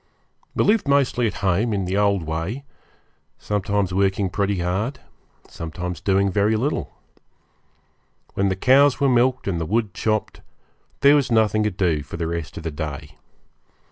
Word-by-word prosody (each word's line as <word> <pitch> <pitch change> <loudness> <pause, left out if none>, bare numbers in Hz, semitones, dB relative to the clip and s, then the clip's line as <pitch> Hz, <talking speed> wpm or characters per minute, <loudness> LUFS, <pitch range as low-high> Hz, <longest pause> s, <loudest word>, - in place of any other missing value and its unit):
We - - +2
lived 210 -6 +2
mostly 135 -4 +2
at - - -4
home, 100 +5 +1
in 100 -2 -1
the 95 +2 -2
old 100 -3 +2
way; 80 - -4 0.7
sometimes 100 -2 -1
working 95 0 +1
pretty 100 0 0
hard, 100 +10 -2 0.5
sometimes 85 +1 -6
doing 100 0 +2
very 105 +3 +2
little. 135 +8 -2 1.4
When 100 0 +1
the 95 - 0
cows 135 +6 +4
were 140 - +3
milked 125 -1 +2
and 85 -4 -1
the - - -1
wood 110 -1 0
chopped, 110 -1 -2 0.6
there 140 +1 +7
was 140 -4 +1
nothing 110 -1 +3
to - - +2
do 90 -6 0
for 70 +3 -8
the 85 - -2
rest 85 -3 -4
of - - -7
the 80 - -3
day. 75 -1 -7
100 Hz, 160 wpm, -22 LUFS, 90-115 Hz, 1.4 s, there